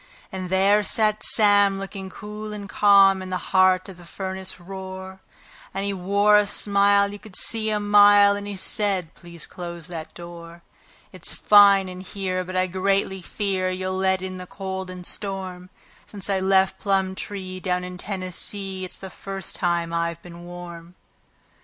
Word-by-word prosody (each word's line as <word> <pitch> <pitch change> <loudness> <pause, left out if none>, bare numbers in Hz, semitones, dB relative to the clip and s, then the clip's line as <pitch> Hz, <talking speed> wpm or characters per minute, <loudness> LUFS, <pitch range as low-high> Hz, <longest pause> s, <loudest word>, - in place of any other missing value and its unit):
And 185 -1 -5
there 195 +3 +3
sat 215 +1 +2
Sam, 205 -2 +5
looking 195 0 -7
cool 210 +2 -8
and 205 -1 -7
calm, 195 -2 +5
in 185 - -7
the 185 - -1 0.2
heart 185 0 +4
of 190 -3 -11
the 175 - -14
furnace 190 +1 -4
roar; 190 +1 -9 0.6
And 195 +1 -2
he 200 - -2
wore 200 +3 +3
a 205 - 0
smile 200 0 +3
you 205 - -9
could 205 -3 -13
see 220 -1 +2
a 210 -1 0
mile, 205 0 +6
and 205 0 -6
he 205 - -5
said: 190 -3 -2
"Please 170 -2 -9
close 170 -2 -8
that 165 -3 -8
door. 170 0 -11 0.5
It's - - +1
fine 200 -2 +6
in 185 0 -8
here, 185 -1 -3
but 185 +1 -8
I 185 0 +2
greatly 190 +1 -1
fear 190 0 -2
you'll 185 0 -3
let 190 0 0
in 185 0 -6
the 180 - -8
cold 190 -1 -6
and 180 -1 -8
storm 185 -3 -5 0.4
Since 200 -1 -4
I 195 - +1
left 190 0 +2
Plumtree, 190 -1 -2
down 180 -1 -2
in 180 0 -8
Tennessee, 190 0 -3
it's 185 - -6
the 190 -1 -9
first 195 -1 -5
time 170 -1 -1
I've 170 0 -2
been 175 0 -11
warm." 175 0 -10
190 Hz, 170 wpm, -23 LUFS, 185-200 Hz, 0.6 s, mile